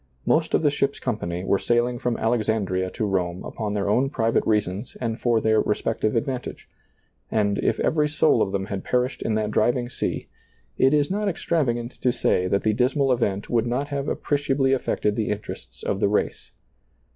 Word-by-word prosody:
Most 160 0 +2
of - - +1
the 145 - +4
ship's 140 -1 -1
com 120 -4 -2
pany 85 0 -4
were 100 - +2
sailing 120 +1 +1
from 120 -1 -1
Alexandria 110 -5 0
to 110 - -3
Rome 90 -3 -1
upon 105 -2 -4
their 100 -1 -1
own 125 +6 +2
private 115 -4 +1
reasons 105 +1 -1
and 115 -2 -3
for 120 -2 +3
their 110 0 +3
respective 110 +1 -1
advantage; 125 +2 -3 0.6
and, 100 -2 +1
if - - 0
every 150 -1 +2
soul 155 +1 +3
of 95 - +1
them 95 -1 -1
had 95 0 -5
per 125 0 +2
ished 130 - -12
in 110 - 0
that 110 -1 -1
driving 120 +3 +1
sea, - - -3 0.5
it 135 - +4
is 145 +3 +1
not 205 +1 0
extravagant 125 -9 -1
to 125 - +3
■ - - +1
say 90 - +1
that 100 +2 +1
the 110 - +2
dismal 130 +4 +2
event 105 -5 0
would 120 -1 +1
not 130 +4 -1
have 140 -1 -2
appre 145 - 0
ciably 135 -1 +2
affected 105 -5 0
the 110 -1 -1
interests 105 0 -6
of 100 - -1
the 100 - +2
race. 105 - -1
115 Hz, 200 wpm, -24 LUFS, 105-130 Hz, 0.6 s, the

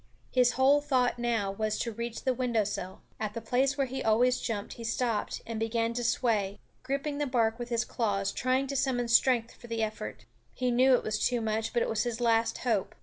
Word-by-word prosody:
His 250 -1 +4
whole 275 +3 +4
thought 255 -4 +1
now 230 -5 0
was 215 +2 -1
to 235 - -2
reach 235 +1 -5
the 260 - +2
window 240 -3 +1
sill. 190 -2 -5 0.2
At 215 0 -3
the - - -2
place 255 +5 +1
where 275 - +2
he 265 +1 -5
always 245 +3 +3
jumped 210 -4 -3
he 235 - -9
stopped 230 -1 -1
and 225 -1 -4
began 230 +1 0
to 240 +1 -2
sway, 215 -5 +1 0.2
gripping 280 +3 -2
the 295 - 0
bark 230 -2 +1
with 240 0 -5
his 235 -1 0
claws, 200 -4 -1
trying 255 +2 +1
to 275 +1 -4
summon 255 -3 0
strength 235 0 +3
for 240 - -14
the 230 -1 -1
effort. 215 - -5 0.3
He 250 -1 0
knew 255 +2 +5
it - - -1
was 215 -1 -1
too 245 -1 +2
much, 220 0 -1
but 240 - +1
it - - -1
was 220 -1 0
his 235 0 -2
last 230 -1 +2
hope. 215 -6 0
235 Hz, 220 wpm, -29 LUFS, 220-255 Hz, 0.3 s, knew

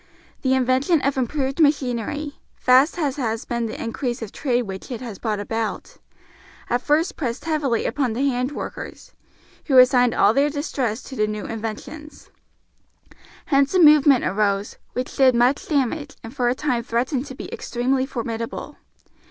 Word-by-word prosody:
The 265 -1 +2
invention 260 +6 +2
of 275 0 +1
improved 265 +2 -2
machinery, 285 -1 0 0.2
vast 260 +7 +4
as 290 -5 -1
has 225 -4 -2
been 235 -1 -2
the 220 - -7
increase 240 +1 -3
of 215 - -7
trade 250 -4 0
which 190 -3 -8
it 245 -4 -4
has 230 -6 -8
brought 215 -3 -2
about, 225 +1 -4 0.7
at 245 +1 +1
first 320 +9 +1
pressed 240 -3 -3
heavily 295 -7 0
upon 255 -2 0
the 265 +5 0
hand 250 0 -1
workers, - - -7 0.5
who 270 -4 +3
assigned 250 -2 +6
all 205 +2 +4
their 280 +3 +3
distress 265 -6 -2
to 265 - -9
the 215 -3 +1
new 210 0 -4
inventions. 225 +8 -7 1.1
Hence 275 +4 +2
a - - +5
movement 295 -4 +6
arose, 200 0 0
which 250 0 -4
did 260 -2 +5
much 245 +4 +2
damage 285 0 -1
and 225 +4 -9
for 245 -3 +1
a 245 - 0
time 255 -4 -1
threatened 250 +4 -1
to 265 - -8
be - - -8
extremely 260 +2 -1
formidable. 230 -3 -5
255 Hz, 160 wpm, -22 LUFS, 230-280 Hz, 1.1 s, assigned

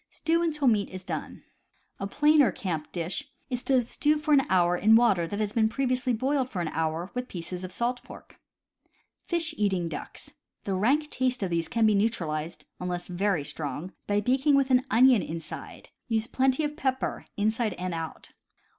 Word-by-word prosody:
Stew 330 +1 0
until 300 -5 0
meat 210 -4 +3
is 185 0 -8
done. - - -6 0.6
A 195 - -3
plainer 295 +1 +4
camp 160 -5 -4
dish 170 0 -4 0.2
is 250 0 -2
to 260 -2 +3
stew 300 +6 +1
for 305 0 +1
an 270 -2 +4
hour 180 -1 +3
in 215 +5 +5
water 200 -8 +4
that 205 +4 -4
has 210 -1 -1 0.2
previously 255 +1 0
been 235 - 0
boiled 265 +1 0
for 190 - -4
an 170 -2 -1
hour 160 +3 -2
with 250 0 -3
pieces 180 +1 -6
of 185 - -6
salt 240 +4 -2
pork. - - -14 0.9
Fish 335 -1 -1
eating 190 -4 +1
Ducks. - - -8 0.2
— - - -53
The 195 - -2
rank 275 +11 +1
taste 255 -3 0
of 185 - -2
these 165 -1 0
can 230 -1 +1
be 215 - +5
neutralized, 165 -7 -1
unless 180 -1 -4
very 180 -3 0
strong, 150 +5 -5
by 205 0 +2
baking 265 +6 +3
with 275 -1 +2
an 255 +1 +3
onion 245 -1 +6
inside. 165 -1 -7 0.2
Use 225 -2 0
plenty 265 +4 +1
of 295 0 -2
pepper, 265 -4 -2
inside 220 +1 0
and 180 0 -4
out. 165 -1 -6
215 Hz, 185 wpm, -27 LUFS, 180-260 Hz, 0.9 s, onion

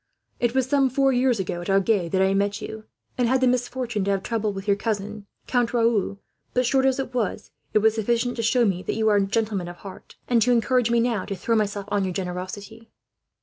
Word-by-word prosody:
It 240 +1 0
was 260 -1 +2
some 275 -1 +3
four 270 +1 +2
years 250 -2 +2
ago, 175 -2 -3
at 175 - -6
Agen, 195 -2 +2
that 190 +2 +2
I 190 0 +2
met 200 +1 0
you, 220 0 -8 0.3
and 245 - +3
had 260 +2 +2
the 260 - +3
misfortune 245 -3 -1
to - - -1
have 195 -1 0
trouble 220 -2 -1
with 195 0 -7
your 200 - +4
cousin, 210 -1 -4 0.2
Count 245 -1 0
Raoul; 225 -4 +1 0.4
but 250 0 +2
short 265 +2 +3
as 265 - +1
it 265 -2 -4
was, 235 -6 -2 0.2
it 215 - +4
was 220 -1 +5
sufficient 235 +2 0
to - - -1
show 235 +2 +3
me 185 -4 0
that - - -3
you 220 0 0
were 210 -1 +4
a - - +3
gentleman 210 -4 -1
of 175 - -8
heart, 190 +2 -12
and 240 -2 +3
to 250 +3 +3
encourage 245 0 +2
me, 235 0 +3
now, 230 -4 0
to 200 - -4
throw 230 +5 -1
myself 205 -2 -1
on 205 -1 +1
your 185 -1 -2
generosity." 195 +5 -6
220 Hz, 235 wpm, -24 LUFS, 200-245 Hz, 0.4 s, was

